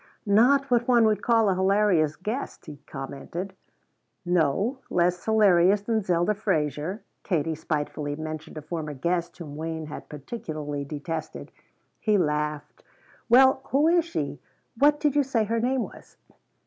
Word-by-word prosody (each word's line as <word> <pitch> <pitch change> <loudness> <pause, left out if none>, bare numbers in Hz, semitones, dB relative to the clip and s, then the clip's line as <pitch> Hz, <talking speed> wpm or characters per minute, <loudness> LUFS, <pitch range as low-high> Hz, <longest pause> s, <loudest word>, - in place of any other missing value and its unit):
"Not 250 +7 +4
what 240 -1 +2
one 240 -3 +5
would 215 -1 +2
call 225 -2 +3
a 195 - +3
hilarious 190 -5 +2
guest," 215 - -5
he 150 -2 -9
commented. 150 +7 -6 0.7
"No, 180 - +1
less 180 0 +1
hilarious 200 -3 +4
than 220 +1 0
Zelda 180 +1 +1
Fraser." 170 - -2 0.2
Katie 165 -4 -1
spitefully 150 -1 -3
mentioned 155 0 -7
a 155 - -7
former 155 -2 -5
guest 170 +5 -2
whom 155 -5 -8
Wayne 160 0 -4
had 150 - -9
particularly 150 - -5
detested. 155 +2 -6 0.5
He 215 -2 +2
laughed. 150 -3 -2 0.5
"Well, 265 +2 +6
who 285 +4 +2
is 345 0 +4
she? 335 - -4 0.4
What 295 +1 +4
did 295 -2 +1
you 290 - +5
say 260 -5 0
her 230 +2 -1
name 250 +1 +1
was?" - - -12
180 Hz, 145 wpm, -26 LUFS, 155-225 Hz, 0.7 s, Well